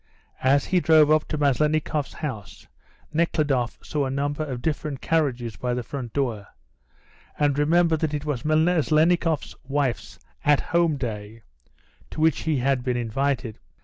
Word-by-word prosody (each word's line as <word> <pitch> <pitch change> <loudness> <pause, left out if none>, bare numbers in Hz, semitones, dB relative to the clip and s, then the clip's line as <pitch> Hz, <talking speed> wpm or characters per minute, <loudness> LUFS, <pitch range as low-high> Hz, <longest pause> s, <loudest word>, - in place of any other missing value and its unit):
As 135 +2 +3
he 185 - +2
drove 155 -3 +5
up 155 0 +3
to 155 - -3
Maslennikoff's 150 +1 0
house 130 -9 -7 0.5
Nekhludoff 150 -6 0
saw 145 -2 -1
a - - -2
number 145 +3 -2
of 130 -5 -5
different 150 -3 -2
carriages 125 -8 -1
by 125 -1 -2
the 125 - -3
front 125 -1 -6
door, 115 -8 -2 0.9
and 145 -1 +1
remembered 165 +1 +3
that 155 -1 -1
it 145 0 -4
was 145 -6 -2
Maslennikoff's 160 0 +2
wife's 135 -3 -2 0.3
"at 145 -1 +4
home" 170 -3 +3
day, 110 -3 -6 0.7
to - - -8
which 160 -1 +3
he 155 - +2
had 130 0 +1
been 125 -1 -1
invited. 120 0 -2
145 Hz, 145 wpm, -24 LUFS, 125-155 Hz, 0.9 s, drove